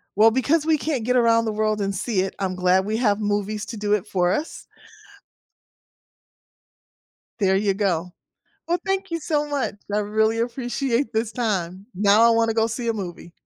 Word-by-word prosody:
Well, 220 +2 +6
because 290 +6 +1
we 320 -1 +3
can't 280 -6 -2
get 250 +1 +1
around 230 -1 +4
the 220 - -1
world 215 0 0
and 195 0 -1
see 205 -1 -1
it, 190 - -3
I'm 185 -2 -2
glad 185 +1 +2
we 215 +2 -1
have 210 -4 +1
movies 205 0 -2
to 230 - -6
do 205 0 0
it 210 -1 0
for 180 -3 +1
us. 315 - -3 2.8
There 190 -1 +3
you 200 -1 +1
go. 180 -4 -1 0.5
Well, 345 +1 +1
thank 390 0 -1
you 335 -1 -2
so 300 -1 -1
much. 285 -6 -2 0.2
I 210 - +2
really 220 +2 +1
appreciate 245 +1 -1
this 220 0 -1
time. 195 -5 -2
Now 205 +3 +4
I 235 - +6
wanna 230 0 +2
go 225 0 +2
see 230 +1 -4
a 230 - +2
movie. 175 -4 -7
220 Hz, 185 wpm, -23 LUFS, 200-245 Hz, 2.8 s, Well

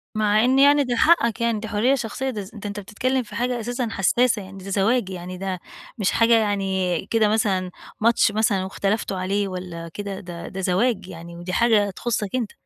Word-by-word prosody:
مع 215 +1 +3
إن 260 +2 +3
يعني 285 +1 +6
دي 245 -2 -1
حقَّك 240 -5 +3
يعني، 230 -2 +1
دي 220 - -6
حرية 225 +5 +2
شخصية 260 +2 -3
ده 215 -5 -4
ز 195 - -9
ده 210 -1 -6
أنت 200 +1 -5
بتتكلّم 255 +6 -1
في 210 -2 -11
حاجة 245 +2 -1
أساسًا 245 +2 -2
حسّاسة 230 +3 +2
يعني 195 0 -11
ده 195 - -7
زواج، 200 +2 +1
يعني 180 0 -6
ده 190 -1 -3 0.4
مش 205 -4 +1
حاجة 230 0 +4
يعني 190 -5 0
كده 225 -2 +3
مثلًا 195 -4 0 0.3
ماتش 230 -1 +4
مثلًا 210 -3 +1
واختلفتوا 195 +1 -2
عليه، 195 +2 -1
والَّا 180 -3 -6
كده، 200 -2 -5
ده 175 -3 -8
ده 190 0 -6
زواج 190 +2 +1
يعني، 170 -1 -9
ودي 175 +1 -6
حاجة 220 -4 +3
تخصَّك 210 +1 -2
أنت. 240 -5 -2
205 Hz, 200 wpm, -23 LUFS, 190-235 Hz, 0.4 s, يعني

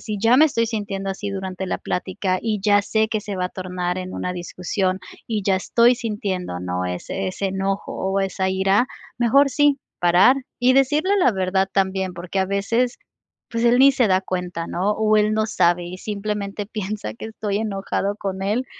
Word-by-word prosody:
si 210 -2 -4
ya 230 +3 +5
me 305 - +7
estoy 230 -7 +1
sintiendo 205 -3 -3
así 200 +1 -4
durante 190 -1 -4
la - - -2
plática, 185 0 -2
y 215 -3 -1
ya 205 -1 +4
sé 220 +1 +1
que 215 -2 -1
se 200 -2 -5
va 180 0 0
a - - -8
tornar 180 -1 -3
en 185 0 -5
una 180 0 -3
discusión 185 +2 -2 0.3
y 215 -3 -2
ya 190 -1 +2
estoy 235 +5 +4
sintiendo, 195 - -3
¿no?, 90 0 -2
ese 90 - -3
ese 195 +1 -3
enojo 195 +1 -2
o 190 +1 -1
esa 190 0 -1
ira, 195 +5 +2 0.3
mejor 275 +4 +4
sí, 290 0 +3 0.2
parar. 180 +9 +5 0.2
Y 255 +1 +4
decirle 300 +9 +3
la 255 - +4
verdad 190 0 0
también, 190 -1 0
porque 175 +2 -5
a 190 - +3
veces, 215 +6 0 0.5
pues, 230 0 -2
él 240 +1 +5
ni 275 +1 +7
se 245 -5 +2
da 185 0 +3
cuenta, 180 -3 -4
¿no? 190 +4 -1
O 215 0 +2
él 210 0 +3
no 215 0 +1
sabe, 175 -3 +2
y 180 +1 -7
simplemente 205 0 -4
piensa 205 - -5
que - - -9
estoy 210 -2 -3
enojada 200 -1 -2
con 190 -1 -4
él, 215 +6 0
195 Hz, 195 wpm, -22 LUFS, 185-220 Hz, 0.5 s, me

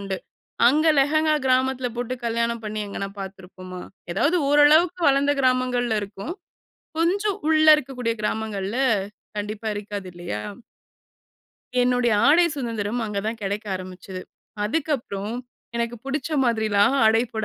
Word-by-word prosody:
உண்டு. 195 -1 -3 0.5
அங்க 305 +4 +3
லெஹங்கா 310 +3 +3
கிராமத்தில 260 0 +2
போட்டு 245 +1 -2
கல்யாணம் 235 0 -1
பண்ணி 215 0 -3
எங்கனா 200 0 -4
பாத்துருப்போமா? 185 -1 -9 0.3
எதாவது, 290 - +2
ஓரளவுக்கு 310 +5 +5
வளந்த 280 +1 +3
கிராமங்கள்ல 250 -3 +1
இருக்கும். 200 - -6 0.6
கொஞ்ச 360 +5 +1 0.2
உள்ள 310 0 +4
இருக்கக்கூடிய 250 -5 -3
கிராமங்கள்ல, 210 -1 -2 0.6
கண்டிப்பா 210 +1 -4
இருக்காது. 205 -2 -6
இல்லையா? 170 -12 -5 1.4
என்னுடைய 245 -1 +2 0.2
ஆடை 340 +4 +6
சுதந்திரம் 230 -3 -2
அங்க 210 -2 -3
தான் 225 +1 -3
கெடைக்க 205 +2 -3
ஆரம்பிச்சுது. 185 0 -8 0.4
அதுக்கப்புறம், 230 -6 -2 0.4
எனக்கு 235 0 -2
புடிச்ச 275 +2 -3 0.2
மாதிரில்லாம் 220 0 +2
ஆடை 225 +1 +5
போட 220 -1 -2
230 Hz, 115 wpm, -24 LUFS, 205-275 Hz, 1.4 s, ஆடை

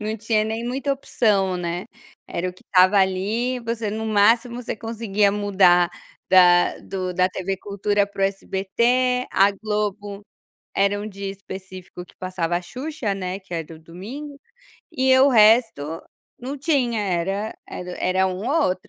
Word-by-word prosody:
não 215 +1 -3
tinha 215 0 0
nem 225 +2 -3
muita 270 +3 -1
opção, 200 -8 +1
né, 175 0 -4 0.4
era 180 +2 -3
o - - -6
que 185 - -21
tava 185 +2 +6
ali, 210 +7 0
você 230 -2 -3
no 220 +1 -4
máximo 230 +4 +2
você 230 - -4
conseguia 215 -3 0
mudar 190 -4 +4 0.4
da 175 -1 +5
do 185 -1 -4
da 185 +1 +3
TV 190 +1 -3
cultura 205 +1 0
para 200 -1 -5
o - - +5
SBT, 235 +6 0
a 195 +1 +5
Globo 205 -1 -3 0.5
era 200 +1 +2
um 210 - -5
dia 200 -1 -6
específico 190 -2 -9
que - - -22
passava 180 -2 -2
a 180 - -3
Xuxa, 255 - -4
né, 185 0 -4
que 185 -3 -9
era 165 0 -5
o - - -13
domingo, 230 - -9 0.5
e 260 -2 +3
o 270 - +6
resto 215 - +3 0.4
não 265 +4 -5
tinha 265 -7 +1
era 195 +2 -2
era 180 0 -7
era 190 +1 +1
um 185 0 -3
ou 320 +2 +2
outro. 185 0 -4
200 Hz, 160 wpm, -22 LUFS, 185-230 Hz, 0.5 s, tava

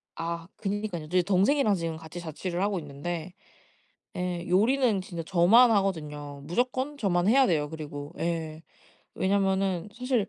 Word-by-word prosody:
아 165 0 -4
그러니까요. 205 -5 -3
이제 180 +3 +2
동생이랑 205 +5 +3
지금 165 -2 -3
같이 160 +2 -9
자취를 175 +2 -4
하고 200 -1 0
있는데 160 +4 -5 0.8
예 180 -1 -2
요리는 220 +3 +3
진짜 170 -3 -6
저만 200 +9 +6
하거든요. 150 -8 -1
무조건 255 - -1
저만 185 -6 +1
해야 265 +3 +5
돼요. 150 -5 +1
그리고 145 -2 -7
예. 165 -2 -3 0.5
왜냐면은 190 -1 +1
사실 250 -4 0
180 Hz, 320 characters per minute, -28 LUFS, 165-205 Hz, 0.8 s, 저만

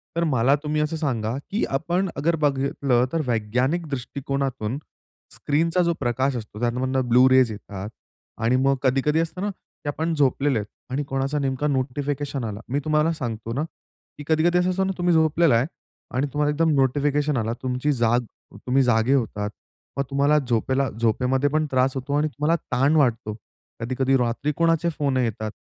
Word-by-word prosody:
तर 170 - +1
मला 130 +1 +3
तुम्ही 150 0 0
असं 150 +2 -1
सांगा, 120 -7 -1 0.2
की 205 - 0
आपण 175 +5 -1
अगर 165 +4 +1
बघितलं 135 -4 +1
तर 165 - +1
वैज्ञानिक 125 +9 0
दृष्टिकोनातून 135 -2 -3 0.6
स्क्रीनचा 165 +5 +1
जो 170 0 +2
प्रकाश 130 +1 0
असतो, 105 -1 -8
त्यामधनं 130 +2 0
ब्लू 125 +2 +6
रेज 130 -3 +5
येतात 100 -1 -7 0.5
आणि 120 +3 +3
मग 135 +1 +3
कधी-कधी 135 +4 +2
असतो 165 +2 -2
ना, 205 - 0
की 175 - -17
आपण 160 +3 -1
झोपलेले 140 -3 +2
आहेत 105 - -5 0.2
आणि 145 +3 -1
कोणाचा 135 +2 -1
नेमका 135 +1 -1
नोटिफिकेशन 140 0 -2
आला. 105 -1 -4
मी 140 +3 0
तुम्हाला 155 +1 +2
सांगतो 115 -6 -4
ना, 140 +5 -1 0.5
की 145 - -7
कधी-कधी 160 +2 +3
असं 180 - +1
असतं 190 +1 0
ना, 190 - -1
तुम्ही 175 -1 +2
झोपलेला 160 -3 +4
आहे 120 +3 +3 0.5
आणि 140 +3 +1
तुम्हाला 150 0 +1
एकदम 160 +1 +2
नोटिफिकेशन 145 +1 +1
आला. 115 0 -1
तुमची 130 +3 0
जाग 120 0 +2 0.5
तुम्ही 135 +1 +3
जागे 120 +1 +3
होतात 105 -5 0 0.5
मग 140 - +1
तुम्हाला 140 +2 +3
झोपेला 130 +1 0
झोपेमध्ये 125 +5 +1
पण 155 +1 +1
त्रास 130 +1 +3
होतो 135 +2 -3
आणि 155 +1 +2
तुम्हाला 150 +3 0 0.2
ताण 135 +5 +3
वाटतो. 115 -7 +2 0.5
कधी-कधी 130 +3 +1
रात्री 125 +4 0
कोणाचे 165 0 +2
फोन 140 -3 0
येतात. 110 -3 -1
135 Hz, 170 wpm, -24 LUFS, 125-150 Hz, 0.6 s, ब्लू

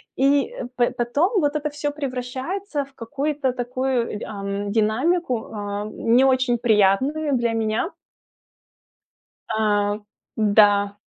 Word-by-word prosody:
и 280 - +2 0.2
по 240 -1 +3
потом 285 - +1
вот 290 +1 +1
это 300 0 -1
всё 290 0 -3
превращается 280 +5 -4
в 275 - -23
какую-то 275 +2 -2
такую, 245 -3 -2
й - - -7
ам, 200 -1 -4
динамику, 245 - +1
а, 205 0 -4
не 240 +5 +3
очень 255 -2 +2
приятную 240 +7 +2
для 235 -1 0
меня. 225 - -1 1.6
А 205 -1 +1 0.4
да. 205 -1 +4
245 Hz, 115 wpm, -23 LUFS, 215-285 Hz, 1.6 s, да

